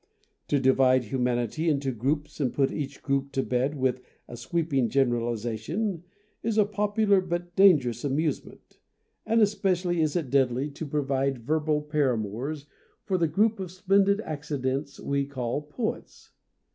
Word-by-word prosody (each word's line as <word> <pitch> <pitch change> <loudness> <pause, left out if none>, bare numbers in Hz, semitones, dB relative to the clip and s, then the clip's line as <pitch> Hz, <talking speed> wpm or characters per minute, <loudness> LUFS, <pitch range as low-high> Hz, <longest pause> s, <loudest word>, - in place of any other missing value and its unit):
To 145 - +2
divide 130 -1 +4
humanity 125 +6 -1
into 140 -3 0
groups 140 +7 -2
and 130 -4 +1
put 135 -1 +1
each 140 -3 -5
group 140 0 -1
to 135 - 0
bed 130 +4 0
with 130 -1 0 0.3
a 120 - -8
sweeping 140 -1 0
generali 120 -3 +1
zation 155 - -3 0.4
is 225 -1 -1
a 210 - +5
popular 205 -1 +2
but 175 -1 -4
dangerous 140 - +4
amuse 145 +1 0
ment, - - -17 0.5
and 225 0 +4
especially 185 -4 +1
is 155 0 0
it 155 -8 -2
deadly 135 +1 +1
to 145 +2 -6
provide 135 -3 -1
verbal 150 +2 0
paramours 140 -1 -1 0.4
for 185 -2 -1
the 165 - +3
group 210 +7 +2
of 185 -2 -4
splendid 195 +2 +2
accidents 140 -3 -3
we 140 0 -1
call 130 0 -3
poets. 185 +10 -5
145 Hz, 145 wpm, -27 LUFS, 130-175 Hz, 0.5 s, a